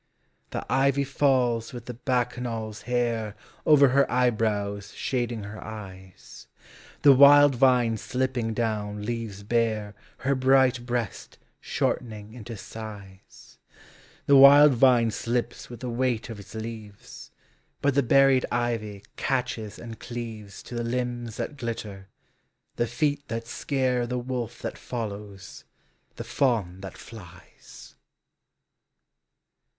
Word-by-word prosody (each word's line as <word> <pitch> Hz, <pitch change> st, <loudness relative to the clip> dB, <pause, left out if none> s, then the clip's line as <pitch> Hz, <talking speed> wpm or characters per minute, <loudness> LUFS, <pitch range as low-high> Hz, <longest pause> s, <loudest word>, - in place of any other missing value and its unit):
The -, -, -5 dB
ivy 140 Hz, +1 st, +2 dB
falls 130 Hz, -4 st, +1 dB
with 120 Hz, -2 st, -8 dB
the 125 Hz, -, -6 dB
Bacchanal's 120 Hz, -3 st, -2 dB
hair 115 Hz, -4 st, -1 dB, 0.3 s
Over 145 Hz, -3 st, +7 dB
her 140 Hz, +2 st, +2 dB
eyebrows 105 Hz, -5 st, 0 dB
shading 120 Hz, -4 st, -2 dB
her 105 Hz, +1 st, -8 dB
eyes: 95 Hz, -4 st, -11 dB, 0.6 s
The 140 Hz, -, +9 dB
wild 145 Hz, +1 st, +8 dB
vine 125 Hz, -3 st, +3 dB
slipping 125 Hz, -2 st, -2 dB
down 105 Hz, -3 st, -2 dB
leaves 115 Hz, -4 st, -4 dB
bare 110 Hz, -2 st, 0 dB, 0.2 s
Her 135 Hz, +2 st, 0 dB
bright 130 Hz, -2 st, +3 dB
breast 120 Hz, -4 st, -4 dB, 0.2 s
shortening 110 Hz, -3 st, -3 dB
into 115 Hz, -1 st, -8 dB
sighs; 100 Hz, -3 st, -11 dB, 0.7 s
The 140 Hz, -, +5 dB
wild 140 Hz, +1 st, +9 dB
vine 120 Hz, -2 st, +4 dB
slips 120 Hz, +2 st, -3 dB
with 120 Hz, -, -10 dB
the 125 Hz, -, -4 dB
weight 120 Hz, -1 st, -1 dB
of 110 Hz, -, -8 dB
its 100 Hz, +2 st, -12 dB
leaves^ 110 Hz, -2 st, -9 dB, 0.5 s
But 140 Hz, 0 st, +1 dB
the 140 Hz, -, +3 dB
berried 135 Hz, +1 st, +4 dB
ivy 115 Hz, -4 st, -2 dB
catches 125 Hz, -5 st, -2 dB
and 115 Hz, -1 st, -9 dB
cleaves 110 Hz, -4 st, -7 dB
To -, -, -11 dB
the 120 Hz, 0 st, -2 dB
limbs 120 Hz, -1 st, -3 dB
that 145 Hz, -, -4 dB
glitter, 105 Hz, -5 st, -6 dB, 0.7 s
the 120 Hz, -, 0 dB
feet 145 Hz, +4 st, -1 dB
that 115 Hz, 0 st, -4 dB
scare 125 Hz, -1 st, -1 dB
The 125 Hz, +1 st, -2 dB
wolf 120 Hz, -2 st, -5 dB
that -, -, -5 dB
follows, 100 Hz, -5 st, -7 dB, 0.5 s
the -, -, -6 dB
fawn 110 Hz, -9 st, 0 dB
that 95 Hz, -1 st, -8 dB
flies. 90 Hz, -6 st, -14 dB
120 Hz, 120 wpm, -26 LUFS, 110-130 Hz, 0.7 s, The